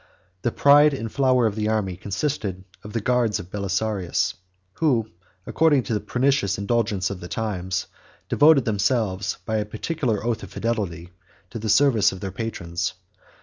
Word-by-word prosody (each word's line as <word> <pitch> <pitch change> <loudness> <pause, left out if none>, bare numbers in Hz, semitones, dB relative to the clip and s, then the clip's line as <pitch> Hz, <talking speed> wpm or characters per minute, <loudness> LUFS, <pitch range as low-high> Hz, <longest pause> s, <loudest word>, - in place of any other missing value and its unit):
The 120 - 0
pride 145 +2 +5
and 115 -4 -5
flower 130 -3 +3
of 110 - +1
the 105 0 -1
army 105 -4 -1
consisted 100 -1 -3 0.2
of 105 - -9
the 115 - -1
guards 115 -3 +1
of 90 -2 -10
Belisarius, 100 -1 -1 0.5
who, 120 -9 +1 0.3
according 150 -5 +3
to 115 - -3
the 105 - +1
pernicious 130 -2 +1
indulgence 100 -2 0
of 95 - -6
the 90 - -8
times, 95 -4 -2 0.4
devoted 150 -3 +5
themselves, 100 -3 0
by 110 - -1
a 105 - 0
particular 110 +1 -2
oath 120 -2 -1
of - - -9
fidelity, 100 -6 -3 0.4
to 115 - -5
the 110 0 -3
service 120 -4 +4
of 95 - -8
their 95 -1 -5
patrons. 85 -6 -3
110 Hz, 160 wpm, -23 LUFS, 95-125 Hz, 0.5 s, pride